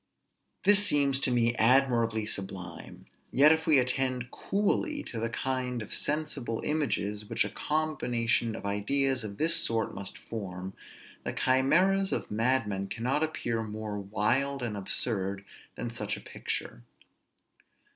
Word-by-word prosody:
This 205 Hz, +1 st, +6 dB
seems 140 Hz, -7 st, +3 dB
to 140 Hz, -, 0 dB
me 120 Hz, -1 st, +2 dB
admirably 115 Hz, -3 st, +3 dB
sublime: 95 Hz, -5 st, -4 dB, 0.3 s
yet 145 Hz, +3 st, +6 dB
if 160 Hz, 0 st, +1 dB
we 155 Hz, -3 st, +6 dB
attend 130 Hz, -1 st, 0 dB
coolly 290 Hz, +9 st, 0 dB
to 115 Hz, -, -5 dB
the 115 Hz, +1 st, -1 dB
kind 125 Hz, +1 st, -2 dB
of 105 Hz, -, -5 dB
sensible 145 Hz, -6 st, -1 dB
images 105 Hz, -9 st, -1 dB
which 115 Hz, +2 st, +1 dB
a -, -, -5 dB
combination 120 Hz, -7 st, 0 dB
of 110 Hz, -, -8 dB
ideas 130 Hz, +6 st, +1 dB
of 100 Hz, -2 st, -6 dB
this 165 Hz, +2 st, +4 dB
sort 115 Hz, -6 st, 0 dB
must 100 Hz, -1 st, -6 dB
form, 95 Hz, -4 st, -6 dB, 0.5 s
the -, -, -3 dB
chimeras 185 Hz, +10 st, +3 dB
of -, -, -2 dB
madmen 105 Hz, -4 st, 0 dB
cannot 125 Hz, +8 st, -1 dB
appear 120 Hz, -7 st, -1 dB
more 105 Hz, -1 st, -5 dB
wild 125 Hz, +7 st, 0 dB
and 115 Hz, -3 st, -3 dB
absurd 100 Hz, -1 st, -1 dB, 0.3 s
than 120 Hz, -, -4 dB
such 105 Hz, -3 st, -3 dB
a -, -, -10 dB
picture. -, -, -5 dB
120 Hz, 135 wpm, -29 LUFS, 105-140 Hz, 0.5 s, This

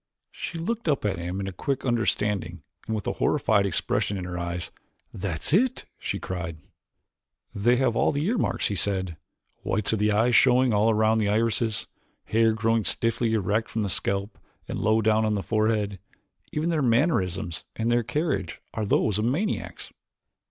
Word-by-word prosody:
She 170 Hz, -, -6 dB
looked 205 Hz, +3 st, -2 dB
up 140 Hz, -7 st, 0 dB
at 95 Hz, -4 st, 0 dB
him 90 Hz, +3 st, -4 dB
in 95 Hz, 0 st, -3 dB
quick 135 Hz, +7 st, -2 dB
understanding 105 Hz, -, 0 dB, 0.2 s
and 110 Hz, -, -1 dB
with 105 Hz, -, -4 dB
a -, -, -1 dB
horrified 100 Hz, -2 st, +3 dB
expression 100 Hz, +2 st, 0 dB
in 90 Hz, -, -4 dB
her 90 Hz, -1 st, -5 dB
eyes. 85 Hz, 0 st, -4 dB, 0.4 s
"That's 90 Hz, -, -3 dB
it!" 245 Hz, +7 st, +2 dB
she -, -, -3 dB
cried. 85 Hz, -3 st, -5 dB, 1.0 s
"They 115 Hz, +3 st, +3 dB
have 125 Hz, -2 st, +1 dB
all -, -, +3 dB
the 145 Hz, +2 st, -1 dB
earmarks," 220 Hz, +2 st, 0 dB
he 100 Hz, -, -2 dB
said. 95 Hz, -3 st, 0 dB, 0.5 s
"Whites 105 Hz, 0 st, 0 dB
of 110 Hz, -, 0 dB
the 105 Hz, +1 st, +2 dB
eyes 115 Hz, +4 st, +3 dB
showing 125 Hz, -1 st, +5 dB
all 105 Hz, +2 st, +3 dB
around 110 Hz, 0 st, +3 dB
the 105 Hz, -2 st, +1 dB
irises, 110 Hz, 0 st, +1 dB, 0.4 s
hair 115 Hz, 0 st, +3 dB
growing 115 Hz, 0 st, +1 dB
stiffly 115 Hz, +1 st, 0 dB
erect 105 Hz, +2 st, 0 dB
from 110 Hz, -, -2 dB
the 100 Hz, -, -2 dB
scalp 100 Hz, +3 st, -1 dB, 0.3 s
and -, -, -4 dB
low 110 Hz, +1 st, +2 dB
down 110 Hz, +1 st, +3 dB
upon 110 Hz, -1 st, +1 dB
the 100 Hz, -, -2 dB
forehead 110 Hz, -3 st, 0 dB, 0.5 s
even 160 Hz, +3 st, -1 dB
their 160 Hz, -2 st, +1 dB
mannerisms 110 Hz, -, +1 dB
and 115 Hz, +1 st, 0 dB
their 120 Hz, 0 st, +3 dB
carriage 150 Hz, +8 st, -2 dB
are 110 Hz, -3 st, -2 dB
those 105 Hz, 0 st, +2 dB
of 110 Hz, -, 0 dB
maniacs." 170 Hz, -, -2 dB
110 Hz, 175 wpm, -26 LUFS, 100-120 Hz, 1.0 s, showing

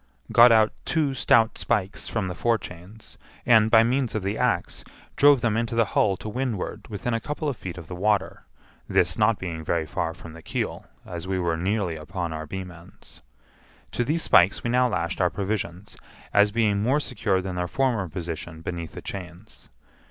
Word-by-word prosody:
Got 120 Hz, +1 st, +8 dB
out 110 Hz, -1 st, +4 dB
two 150 Hz, -4 st, 0 dB
stout 115 Hz, -3 st, +3 dB
spikes 100 Hz, -3 st, -1 dB
from 110 Hz, -5 st, -2 dB
the 90 Hz, -, -4 dB
forechains, 105 Hz, -1 st, -4 dB, 0.3 s
and, 110 Hz, -2 st, +5 dB
by 110 Hz, 0 st, +6 dB
means 125 Hz, 0 st, 0 dB
of 110 Hz, -, -2 dB
the 100 Hz, +2 st, -1 dB
axe, 115 Hz, -8 st, -1 dB, 0.3 s
drove 145 Hz, -3 st, +6 dB
them 110 Hz, -3 st, +1 dB
into 115 Hz, 0 st, -1 dB
the 115 Hz, -1 st, +3 dB
hull 100 Hz, -3 st, +2 dB
to -, -, -8 dB
windward 115 Hz, -2 st, -3 dB
within 110 Hz, +3 st, -3 dB
a 115 Hz, -, +1 dB
couple 150 Hz, +5 st, -4 dB
of 140 Hz, -, -1 dB
feet 90 Hz, -4 st, -7 dB
of 85 Hz, -, -8 dB
the 90 Hz, -, -8 dB
water, 100 Hz, +1 st, 0 dB, 0.5 s
this -, -, +2 dB
not 110 Hz, 0 st, +3 dB
being 85 Hz, -3 st, -5 dB
very 80 Hz, 0 st, 0 dB
far 80 Hz, +2 st, -3 dB
from 80 Hz, -, -11 dB
the 85 Hz, -, -11 dB
keel, -, -, -4 dB, 0.2 s
as 85 Hz, 0 st, -7 dB
we 95 Hz, 0 st, -1 dB
were 85 Hz, -2 st, 0 dB
nearly 90 Hz, -1 st, -1 dB
upon 85 Hz, +2 st, -5 dB
our 80 Hz, 0 st, -6 dB
beam 95 Hz, +2 st, -6 dB
ends. 85 Hz, 0 st, -16 dB, 0.7 s
To 120 Hz, -, 0 dB
these 160 Hz, +6 st, -1 dB
spikes 95 Hz, -1 st, +4 dB
we 120 Hz, -, -1 dB
now 125 Hz, +1 st, +3 dB
lashed 90 Hz, -4 st, -2 dB
our 90 Hz, -, +3 dB
provisions, 95 Hz, -1 st, -4 dB, 0.4 s
as 105 Hz, +1 st, +5 dB
being 105 Hz, -2 st, +1 dB
more 130 Hz, +7 st, +2 dB
secure 105 Hz, -8 st, -1 dB
than 95 Hz, 0 st, -4 dB
their 90 Hz, 0 st, -2 dB
former 115 Hz, -6 st, 0 dB
position 80 Hz, -1 st, -6 dB
beneath 85 Hz, -2 st, -5 dB
the -, -, -9 dB
chains. 90 Hz, +2 st, -9 dB
100 Hz, 190 wpm, -25 LUFS, 90-115 Hz, 0.7 s, Got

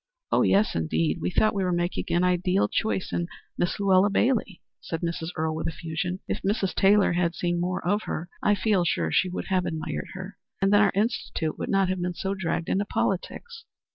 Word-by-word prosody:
"Oh, -, -, +4 dB
yes, 205 Hz, +2 st, +3 dB
indeed. 80 Hz, -1 st, 0 dB
We 85 Hz, -, 0 dB
thought 215 Hz, -, +2 dB
we 195 Hz, -2 st, 0 dB
were 180 Hz, -, 0 dB
making 175 Hz, +1 st, -1 dB
an 175 Hz, +1 st, +2 dB
ideal 180 Hz, +1 st, +2 dB
choice 215 Hz, -4 st, -1 dB
in 170 Hz, -, -1 dB, 0.3 s
Miss 175 Hz, -, -1 dB
Luella 195 Hz, 0 st, +4 dB
Bailey," 220 Hz, -2 st, +1 dB, 0.2 s
said 165 Hz, -, -5 dB
Mrs. 170 Hz, -1 st, -3 dB
Earle 160 Hz, -1 st, -1 dB
with 160 Hz, -, -3 dB
effusion. 165 Hz, +3 st, -3 dB
"If -, -, -2 dB
Mrs. 195 Hz, -1 st, 0 dB
Taylor 200 Hz, -1 st, +4 dB
had 170 Hz, -1 st, 0 dB
seen 175 Hz, 0 st, -1 dB
more 180 Hz, -1 st, -2 dB
of 205 Hz, +3 st, +2 dB
her, 165 Hz, -, -4 dB
I 205 Hz, -, +3 dB
feel 195 Hz, -2 st, +2 dB
sure 85 Hz, -, 0 dB
she 185 Hz, -, +2 dB
would 180 Hz, -, -5 dB
have 185 Hz, -2 st, +1 dB
admired 160 Hz, -1 st, -4 dB
her, 190 Hz, 0 st, -8 dB, 0.2 s
and 195 Hz, +1 st, +2 dB
then 205 Hz, -, +6 dB
our 210 Hz, -, +4 dB
Institute 200 Hz, -7 st, -1 dB
would -, -, -3 dB
not 195 Hz, -1 st, +3 dB
have 185 Hz, -1 st, -1 dB
been 180 Hz, 0 st, -2 dB, 0.2 s
dragged 170 Hz, -3 st, -2 dB
into 195 Hz, -, +1 dB
politics." 455 Hz, -, -3 dB
180 Hz, 200 wpm, -26 LUFS, 170-195 Hz, 0.3 s, then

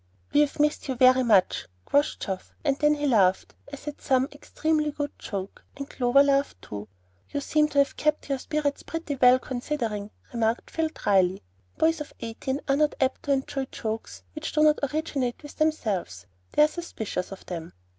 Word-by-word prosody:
"We've 295 Hz, 0 st, +3 dB
missed 300 Hz, 0 st, +1 dB
you 265 Hz, -, -1 dB
very 255 Hz, +1 st, +6 dB
much," 215 Hz, -7 st, +3 dB, 0.2 s
quoth 290 Hz, +1 st, +2 dB
Geoff; 190 Hz, -2 st, -5 dB
and 280 Hz, -3 st, +2 dB
then 300 Hz, 0 st, +4 dB
he 295 Hz, 0 st, -2 dB
laughed 195 Hz, -8 st, +3 dB, 0.2 s
as 280 Hz, +1 st, -9 dB
at 295 Hz, -, -6 dB
some 260 Hz, 0 st, +2 dB
extremely 310 Hz, -1 st, -1 dB
good 290 Hz, 0 st, -3 dB
joke, 195 Hz, -1 st, -6 dB
and 280 Hz, 0 st, -5 dB
Clover 260 Hz, +2 st, +4 dB
laughed 280 Hz, 0 st, +1 dB
too. 105 Hz, 0 st, -7 dB, 0.4 s
"You 285 Hz, -, -2 dB
seem 300 Hz, +2 st, +2 dB
to 290 Hz, -, -6 dB
have 280 Hz, 0 st, +3 dB
kept 305 Hz, 0 st, +1 dB
up -, -, -15 dB
your 275 Hz, -1 st, 0 dB
spirits 295 Hz, 0 st, -1 dB
pretty 325 Hz, -3 st, -4 dB
well, 250 Hz, 0 st, +7 dB
considering," 240 Hz, -5 st, -3 dB, 0.2 s
remarked 230 Hz, 0 st, 0 dB
Phil, 320 Hz, -1 st, 0 dB
dryly. 190 Hz, -, +2 dB, 0.3 s
Boys 325 Hz, 0 st, +2 dB
of 300 Hz, -, -7 dB
eighteen 255 Hz, +4 st, -4 dB
are 275 Hz, 0 st, +3 dB
not 300 Hz, 0 st, +2 dB
apt 265 Hz, -1 st, +1 dB
to 285 Hz, -, 0 dB
enjoy 270 Hz, 0 st, 0 dB
jokes 220 Hz, -3 st, -5 dB
which 305 Hz, +1 st, -5 dB
do 305 Hz, -, +3 dB
not 305 Hz, 0 st, +5 dB
originate 290 Hz, -5 st, -2 dB
with 290 Hz, -, -11 dB
themselves; 205 Hz, -, -1 dB, 0.3 s
they -, -, +6 dB
are -, -, +6 dB
suspicious 225 Hz, -, -5 dB
of 195 Hz, -, -9 dB
them. 170 Hz, -2 st, -6 dB
275 Hz, 185 wpm, -26 LUFS, 225-300 Hz, 0.4 s, well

